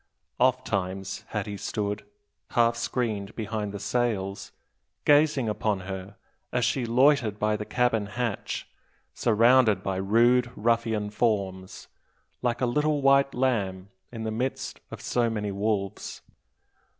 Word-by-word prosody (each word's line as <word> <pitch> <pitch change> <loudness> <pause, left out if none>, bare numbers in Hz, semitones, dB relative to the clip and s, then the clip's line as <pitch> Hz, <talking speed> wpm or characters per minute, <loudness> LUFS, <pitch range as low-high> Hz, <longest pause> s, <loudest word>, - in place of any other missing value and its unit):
Ofttimes 100 -7 0
had 105 -3 -3
he 105 - -5
stood, 105 +1 -3 0.5
half 115 0 +4
screened 115 -4 -2
behind 110 -2 -3
the 100 - -5
sails, 105 -5 -1 0.5
gazing 145 -4 +4
upon 105 -2 -1
her 95 +1 -7 0.4
as 125 -1 +1
she 125 -3 0
loitered 120 -3 +3
by 105 0 +1
the 105 0 -4
cabin 120 -4 +1
hatch, 115 0 -3 0.5
surrounded 115 -3 +4
by 95 -1 -1
rude 120 +5 +3
ruffian 110 -2 0
forms, 100 -4 -1 0.5
like 120 0 -1
a - - +3
little 150 +3 +1
white 140 0 +4
lamb 100 -7 0 0.2
in 115 -2 -6
the 110 - -2
midst 125 +4 -3
of - - -8
so 120 -1 +1
many 105 -2 -2
wolves. 100 -1 -2
110 Hz, 125 wpm, -27 LUFS, 100-125 Hz, 0.5 s, half